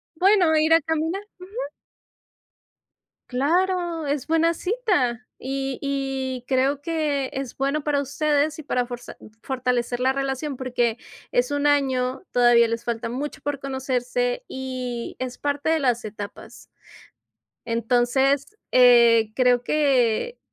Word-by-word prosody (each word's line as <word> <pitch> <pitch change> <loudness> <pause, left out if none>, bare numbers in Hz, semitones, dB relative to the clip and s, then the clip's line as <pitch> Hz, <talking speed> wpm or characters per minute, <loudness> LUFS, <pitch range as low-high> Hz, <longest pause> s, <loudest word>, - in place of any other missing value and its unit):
Bueno, 365 -2 +4
ir 315 +1 +4
a 330 - +6
caminar. 320 +5 -1 0.2
Ujú. 365 +1 -11 1.8
Claro, 340 +4 0
es 285 -2 -1
buena 325 +1 +2
cita 350 - 0
y 270 0 -3
y 270 -2 -3
creo 270 +2 +1
que 295 -4 -1
es 265 -2 -5
bueno 275 +2 -1
para 285 -1 +1
ustedes 295 +2 0
y 310 - -8
para 250 -3 -1
forza 245 -1 -8 0.3
fortalecer 250 -2 -1
la 260 +1 +2
relación, 275 0 -3
porque 240 -3 0 0.3
es 250 +3 +1
un 290 0 +1
año, 265 -1 +1
todavía 240 -1 +5
les 230 +1 -3
falta 230 0 -3
mucho 285 +6 -5
por 290 -1 -3
conocerse 275 - -2
y 255 -2 -5
es 255 -1 -4
parte 290 +1 -1
de 320 - +3
las 245 -5 0
etapas. 205 -1 -8 1.1
Entonces, 250 - +1
eh, 235 -3 +6
creo 250 -1 +3
que 275 - +1
270 Hz, 125 wpm, -24 LUFS, 245-305 Hz, 1.8 s, a